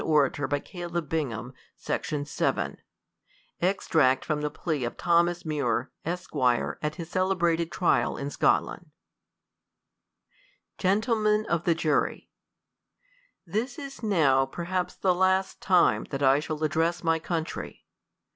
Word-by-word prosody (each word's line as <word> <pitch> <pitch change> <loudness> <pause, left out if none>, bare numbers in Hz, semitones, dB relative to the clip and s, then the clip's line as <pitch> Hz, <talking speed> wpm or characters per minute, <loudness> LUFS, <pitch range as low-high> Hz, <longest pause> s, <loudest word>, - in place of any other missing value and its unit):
Extract 150 -4 +3
THE 145 -2 -3
COLUMBIAN 170 -5 -3
ORATORc 135 +4 -3 0.8
Extract 160 -8 +2
from 150 -2 -1
the 150 - -1
Plea 150 -2 -3
of 120 - -4
Thomas 170 0 +2
Muir, 135 -5 -1
Esq, 175 0 -5
AT 130 +3 0
HIS 170 -2 -8
CELEBRATED 175 -3 +1
TrIAL 180 - +1
IN 140 +1 -4
SCOTLAND. - - +1 1.9
Gentlemen 215 +2 +2
of 170 0 0
the 170 - +3
Jurv, 155 -2 0 1.2
THIS 220 - -2
is 275 -2 -8
now 145 - +3
perhaps 175 +5 -3
the 185 -2 +2
last 190 +1 +1
time 180 -2 +3
that 140 0 -4
I 135 +1 +5
shall 155 0 -4
ad 150 - -1
dress 170 +2 0
my 165 -1 +2
country. 165 0 -4
165 Hz, 120 wpm, -27 LUFS, 145-180 Hz, 1.9 s, I